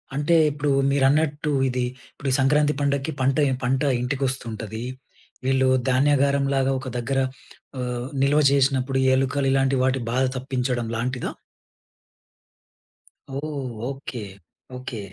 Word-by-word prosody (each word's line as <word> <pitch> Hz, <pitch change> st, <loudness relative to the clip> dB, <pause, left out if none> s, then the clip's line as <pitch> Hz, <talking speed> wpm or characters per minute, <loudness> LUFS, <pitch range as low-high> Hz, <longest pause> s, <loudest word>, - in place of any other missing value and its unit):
అంటే 150 Hz, +4 st, +2 dB, 0.2 s
ఇప్పుడు 145 Hz, 0 st, -2 dB, 0.2 s
మీరన్నట్టు 145 Hz, +2 st, +2 dB, 0.2 s
ఇది 125 Hz, 0 st, -1 dB, 0.3 s
ఇప్పుడు 140 Hz, -, -4 dB
ఈ -, -, +2 dB
సంక్రాంతి 150 Hz, +2 st, +3 dB
పండక్కి 140 Hz, +2 st, 0 dB
పంట 135 Hz, +2 st, +2 dB, 0.3 s
పంట 130 Hz, +2 st, +1 dB, 0.2 s
ఇంటికొస్తుంటది. 120 Hz, -5 st, -3 dB, 0.6 s
వీళ్ళు 130 Hz, 0 st, +3 dB, 0.2 s
ధాన్యాగారంలాగా 140 Hz, 0 st, +2 dB
ఒక 130 Hz, -, -8 dB
దగ్గర 135 Hz, +3 st, -1 dB, 0.6 s
ఆహ్, 125 Hz, -1 st, -3 dB, 0.2 s
నిల్వ 140 Hz, +2 st, +4 dB
జేసినప్పుడు 135 Hz, -1 st, +2 dB, 0.2 s
ఎలుకలు, 135 Hz, +1 st, 0 dB
ఇలాంటి 135 Hz, 0 st, +2 dB
వాటి 130 Hz, 0 st, +1 dB
బాధ 130 Hz, +2 st, +2 dB
తప్పించడం 125 Hz, -2 st, -2 dB
లాంటిదా? 125 Hz, +2 st, -2 dB, 2.1 s
ఓహ్! 140 Hz, -3 st, -4 dB, 0.2 s
ఓకే. 135 Hz, -3 st, -6 dB, 0.6 s
ఓకే. 125 Hz, -3 st, -6 dB
135 Hz, 105 wpm, -24 LUFS, 130-140 Hz, 2.1 s, నిల్వ